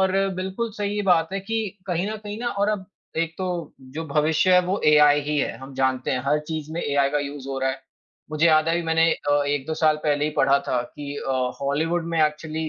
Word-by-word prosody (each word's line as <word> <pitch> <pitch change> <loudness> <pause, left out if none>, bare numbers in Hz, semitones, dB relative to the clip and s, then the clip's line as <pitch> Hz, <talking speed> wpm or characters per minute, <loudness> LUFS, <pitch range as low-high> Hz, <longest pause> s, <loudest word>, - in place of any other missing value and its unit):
और 190 0 +2 0.2
बिल्कुल 190 +5 -3
सही 205 0 -1
बात 165 +2 +1
है 195 - -2
कि 225 +4 -2 0.3
कहीं 180 +1 -1
न 220 - -4
कहीं 205 +1 -5
ना 240 - -1
और 205 - +2
अब 210 -3 -1 0.4
एक 165 0 -11
तो 185 -1 -2 0.5
जो 160 - -3
भविष्य 155 +5 +2
है 180 - +7
वो 190 +3 -1
एआई 150 -1 +6
ही 150 +1 -2
है, - - -1
हम 135 0 -10
जानते 130 -1 0
हैं 125 - -1
हर 150 +2 +3
चीज़ 155 -1 -4
में 170 - -2
एआई 140 -1 +2
का 150 - +1
यूज़ 140 -1 -6
हो 135 - -3
रहा 135 - +1
है। 135 0 -6 0.5
मुझे 155 +2 +2
याद 155 0 +4
है 165 - +2
अभी 175 - 0
मैंने 165 0 +3
अ, 145 0 +1
1-2 145 +2 -1
साल 155 -1 +5
पहले 145 -1 +2
ही 150 - 0
पढ़ा 140 +1 +4
था 125 - +1
कि 145 +3 -8
अ, 135 - -3 0.3
हॉलीवुड 160 +5 0
में 160 - +2
एक्चुअली 155 +1 -4
155 Hz, 235 wpm, -24 LUFS, 145-175 Hz, 0.5 s, है